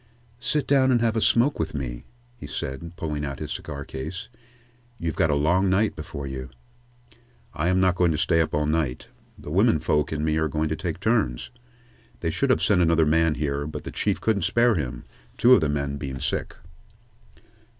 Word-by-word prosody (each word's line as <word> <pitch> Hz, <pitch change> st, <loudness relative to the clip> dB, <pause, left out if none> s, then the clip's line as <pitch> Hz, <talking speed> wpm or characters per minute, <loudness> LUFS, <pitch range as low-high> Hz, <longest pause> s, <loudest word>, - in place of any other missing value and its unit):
"Sit 150 Hz, +4 st, 0 dB
down 135 Hz, -2 st, +4 dB
and 120 Hz, -, +4 dB
have 115 Hz, -1 st, +1 dB
a 110 Hz, -, +1 dB
smoke 120 Hz, +7 st, +3 dB
with 80 Hz, -1 st, -2 dB
me," -, -, -5 dB, 0.3 s
he 120 Hz, -, -9 dB
said, 70 Hz, +4 st, -5 dB
pulling 75 Hz, -3 st, -3 dB
out 70 Hz, -2 st, -4 dB
his -, -, -6 dB
cigar 70 Hz, -2 st, -6 dB
case. 80 Hz, -, -6 dB, 0.7 s
"You've 80 Hz, -2 st, -3 dB
got 80 Hz, -, +2 dB
a 75 Hz, -, +2 dB
long 90 Hz, +7 st, +2 dB
night 100 Hz, +3 st, +2 dB
before 75 Hz, -2 st, -7 dB
you." 65 Hz, -1 st, -6 dB, 1.0 s
"I 80 Hz, +2 st, -1 dB
am 90 Hz, +1 st, +3 dB
not 95 Hz, -1 st, +4 dB
going 90 Hz, -1 st, +2 dB
to 75 Hz, -, -1 dB
stay 80 Hz, 0 st, +2 dB
up 80 Hz, -, -1 dB
all 75 Hz, 0 st, +1 dB
night. 75 Hz, -4 st, -1 dB, 0.3 s
The -, -, -9 dB
women -, -, +3 dB
folks 75 Hz, +2 st, 0 dB
and 75 Hz, 0 st, -2 dB
me 80 Hz, 0 st, +1 dB
are 80 Hz, 0 st, +1 dB
going 80 Hz, +1 st, -1 dB
to 80 Hz, -, -1 dB
take -, -, -4 dB
turns. -, -, 0 dB, 0.7 s
They -, -, 0 dB
should -, -, 0 dB
have -, -, +3 dB
sent 90 Hz, -, +3 dB
another 80 Hz, -1 st, +4 dB
man 80 Hz, 0 st, +3 dB
here, 70 Hz, -1 st, -2 dB
but 75 Hz, -, -6 dB
the -, -, -6 dB
Chief -, -, -1 dB
couldn't 110 Hz, -3 st, +1 dB
spare 115 Hz, +7 st, +3 dB
him, 65 Hz, -, -3 dB, 0.3 s
two 125 Hz, +2 st, +6 dB
of 105 Hz, -, +6 dB
the 75 Hz, -, +1 dB
men 70 Hz, -1 st, -2 dB
being 65 Hz, -2 st, -5 dB
sick." -, -, -2 dB
80 Hz, 200 wpm, -25 LUFS, 70-90 Hz, 1.0 s, two